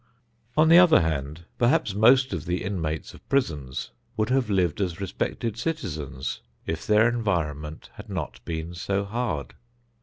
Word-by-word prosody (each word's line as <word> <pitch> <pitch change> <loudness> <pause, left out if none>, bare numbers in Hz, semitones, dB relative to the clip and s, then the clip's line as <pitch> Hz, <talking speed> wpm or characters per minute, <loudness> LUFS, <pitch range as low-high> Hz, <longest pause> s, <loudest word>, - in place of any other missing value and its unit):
On 155 +1 +6
the 170 +2 +9
other 175 - +7
hand, 80 +1 -2
perhaps 120 -2 +3
most 125 +4 +5
of 80 -5 -4
the 90 +1 -1
inmates 80 -6 -3
of - - -17
prisons 70 - -1 0.3
would 110 +1 +1
have 130 -3 +2
lived 95 -3 +1
as 90 -1 -2
respected 100 +3 -3
citizens 80 - -4 0.2
if 80 -1 -4
their 105 +2 +5
environment 80 -10 -2
had - - -10
not - - -5
been 80 +1 -4
so 100 +3 -1
hard. 100 - -3
95 Hz, 150 wpm, -26 LUFS, 80-115 Hz, 0.3 s, the